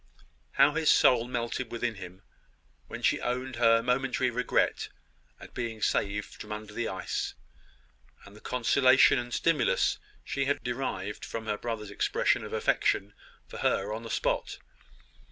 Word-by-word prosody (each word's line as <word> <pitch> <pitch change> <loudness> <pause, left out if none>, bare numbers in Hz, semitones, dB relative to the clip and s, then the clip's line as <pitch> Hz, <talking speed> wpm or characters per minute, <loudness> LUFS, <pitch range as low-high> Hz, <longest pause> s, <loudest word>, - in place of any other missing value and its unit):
How 140 +2 +5
his 160 0 +1
soul 120 -2 +5
melted 120 0 -3
within 120 0 -2
him 95 -2 -11 0.6
when - - -8
she - - +2
owned 125 0 -3
her 115 -1 +4
momentary 125 0 +1
regret 125 +1 0 0.5
at - - -13
being 115 -3 -4
saved 105 0 -1
from 105 - -9
under 105 0 -6
the 120 +1 -2
ice, 95 - -3 0.9
and 100 - -14
the 105 - -15
consolation 130 +2 +4
and 120 0 -6
stimulus 160 +1 +1 0.2
she 140 - -2
had 140 -3 -1
derived 120 -5 -4
from 115 -1 -5
her 105 - -1
brother's 105 -2 -5
expression - - +1
of - - -8
affection 100 +1 +1 0.3
for - - -9
her 100 +2 0
on 110 - -5
the 115 - -8
spot! - - -1
115 Hz, 150 wpm, -29 LUFS, 105-125 Hz, 0.9 s, How